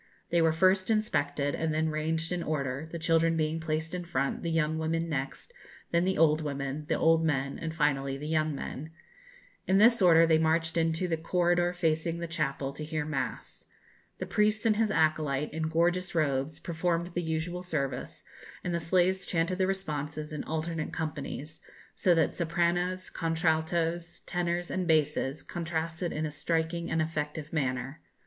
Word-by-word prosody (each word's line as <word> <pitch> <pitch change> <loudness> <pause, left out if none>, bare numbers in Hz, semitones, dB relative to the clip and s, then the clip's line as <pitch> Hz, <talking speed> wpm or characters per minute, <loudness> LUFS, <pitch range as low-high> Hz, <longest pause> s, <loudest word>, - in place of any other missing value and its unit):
They 170 0 +4
were 165 0 +4
first 185 +4 +3
inspected, 145 -10 +1
and 160 -1 -1
then 160 0 +1
ranged 160 +2 -1
in 180 -1 -1
order, 145 -1 -2
the 170 - -4
children 165 0 +2
being 155 +1 0
placed 160 +1 -2
in 180 -1 -3
front, 140 -6 -1
the 170 - -2
young 160 -1 +1
women 165 +1 -1
next, 140 - -4 0.4
then 170 +1 +3
the 190 0 +1
old 155 0 +4
women, 140 0 -3
the - - +2
old 165 0 +4
men, 140 -3 0
and 160 - -3
finally 140 -3 0
the 150 +2 -6
young 155 -1 +1
men. 145 +2 -6 0.8
In 190 - +4
this 230 +2 +6
order 165 -2 +7
they 160 -1 +4
marched 160 +1 +1
into 165 +2 +1
the 165 -2 0
corridor 175 +1 +2
facing 165 -1 0
the 170 - -3
chapel, 140 -4 -2
to 150 - -6
hear 155 -1 -2
mass. 130 -6 -4 0.5
The - - -4
priest 215 +1 +1
and 220 -2 +4
his 220 -1 +2
acolyte, 155 -5 +1
in 160 0 -1
gorgeous 175 +3 +1
robes, 145 -1 0
performed 170 0 -1
the 175 - -1
usual 165 +2 -2
service, 140 -7 -3 0.4
and 175 - -2
the 170 - +1
slaves 185 +3 +2
chanted 170 +2 -1
the 185 - +3
responses 150 -5 -3
in 150 - -3
alternate 160 0 -3
companies, 155 -1 -5 0.3
so 180 -2 +3
that 165 - +2
sopranos, 175 +2 0
contraltos, 165 +1 0
tenors, 175 0 -1
and 185 -2 -1
basses, 150 -3 +1
contrasted 165 0 -3
in 155 +1 -2
a 155 - -3
striking 165 +2 -1
and 160 0 +1
effective 155 -1 -4
manner. 135 -1 -2
160 Hz, 170 wpm, -29 LUFS, 155-175 Hz, 0.8 s, order